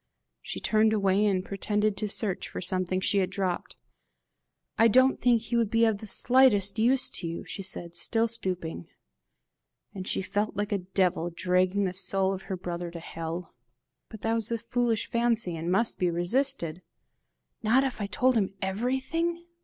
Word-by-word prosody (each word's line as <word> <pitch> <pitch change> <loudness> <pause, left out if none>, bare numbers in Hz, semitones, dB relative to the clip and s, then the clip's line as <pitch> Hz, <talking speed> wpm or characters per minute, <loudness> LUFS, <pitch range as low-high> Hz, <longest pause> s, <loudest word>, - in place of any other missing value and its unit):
She - - -6
turned 220 0 +2
away, 200 0 +2
and 185 -2 0
pretended 210 +1 -1
to 215 - -2
search 205 -2 -1
for - - -6
something 185 0 -1
she 200 +1 +2
had 185 - 0
dropped. 185 -3 -3 1.0
"I 225 - +5
don't 260 +4 +4
think 235 -2 +3
he 235 - -3
would 230 -3 +2
be 230 +1 +3
of 220 -3 +1
the 220 - -8
slightest 220 -4 +4
use 250 +3 +5
to 170 - -4
you," 165 +1 -5
she - - -6
said, 175 -2 -2
still 225 +6 0
stooping. 180 - -3 1.1
And 185 -2 -7
she - - -1
felt 205 +3 -2
like 205 +1 -2
a 200 - +1
devil 180 -2 0
dragging 185 +3 +1
the 185 -2 -1
soul 190 0 -1
of 190 - -6
her 190 - -2
brother 175 -1 -5
to 170 0 -8
hell. 165 +1 -6 0.6
But 220 -2 -11
that 225 +2 0
was 225 -1 -1
a 230 - -1
foolish 230 -1 -1
fancy, 230 -6 0
and 165 +2 -3
must 225 +5 +1
be 180 - +2
resisted! 175 - 0 0.8
"Not 240 +4 +3
if 260 -5 -3
I 200 - -2
told 255 +5 +2
him 195 -3 0
everything?" 265 - -2
200 Hz, 175 wpm, -27 LUFS, 185-230 Hz, 1.1 s, I